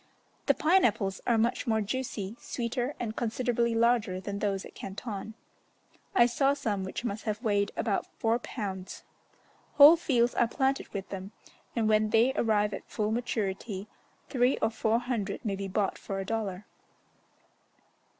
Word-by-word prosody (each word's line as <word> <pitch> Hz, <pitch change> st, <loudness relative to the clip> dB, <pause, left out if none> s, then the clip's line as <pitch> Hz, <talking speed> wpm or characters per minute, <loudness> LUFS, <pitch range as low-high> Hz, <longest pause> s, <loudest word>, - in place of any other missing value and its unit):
The -, -, +5 dB
pine 365 Hz, +5 st, +4 dB
apples 200 Hz, -4 st, +1 dB
are 235 Hz, -, +4 dB
much 230 Hz, +2 st, 0 dB
more 220 Hz, -1 st, +2 dB
juicy, 215 Hz, -2 st, -3 dB
sweeter, 245 Hz, +3 st, -3 dB
and 220 Hz, -2 st, -3 dB
considerably 235 Hz, 0 st, 0 dB
larger 225 Hz, -5 st, +2 dB
than 200 Hz, +1 st, -5 dB
those 195 Hz, -2 st, -1 dB
at -, -, -12 dB
Canton; 210 Hz, +1 st, -6 dB, 0.8 s
I 235 Hz, -, +7 dB
saw 270 Hz, +3 st, +2 dB
some 205 Hz, -8 st, -2 dB
which 190 Hz, +5 st, -5 dB
must 210 Hz, -1 st, -4 dB
have 215 Hz, +1 st, -2 dB
weighed 205 Hz, -2 st, +1 dB
about 210 Hz, -4 st, 0 dB
four 225 Hz, +1 st, +1 dB
pounds. 195 Hz, -6 st, -6 dB, 0.7 s
Whole 295 Hz, +3 st, +10 dB
fields 245 Hz, -7 st, +1 dB
are 240 Hz, -, +3 dB
planted 270 Hz, +2 st, 0 dB
with 195 Hz, -2 st, -6 dB
them, 195 Hz, +1 st, -7 dB, 0.4 s
and 225 Hz, -2 st, +1 dB
when 215 Hz, 0 st, +3 dB
they 230 Hz, +4 st, +4 dB
arrive 210 Hz, -4 st, +1 dB
at -, -, -7 dB
full 215 Hz, 0 st, -1 dB
maturity, 210 Hz, -3 st, -2 dB, 0.4 s
three 250 Hz, 0 st, +2 dB
or 220 Hz, -, +1 dB
four 220 Hz, 0 st, +1 dB
hundred 235 Hz, -4 st, -3 dB
may 200 Hz, -2 st, 0 dB
be 195 Hz, 0 st, -4 dB
bought 195 Hz, +1 st, -1 dB
for 195 Hz, -1 st, -4 dB
a 195 Hz, -, -3 dB
dollar. 210 Hz, -3 st, -3 dB
220 Hz, 160 wpm, -29 LUFS, 200-240 Hz, 0.8 s, Whole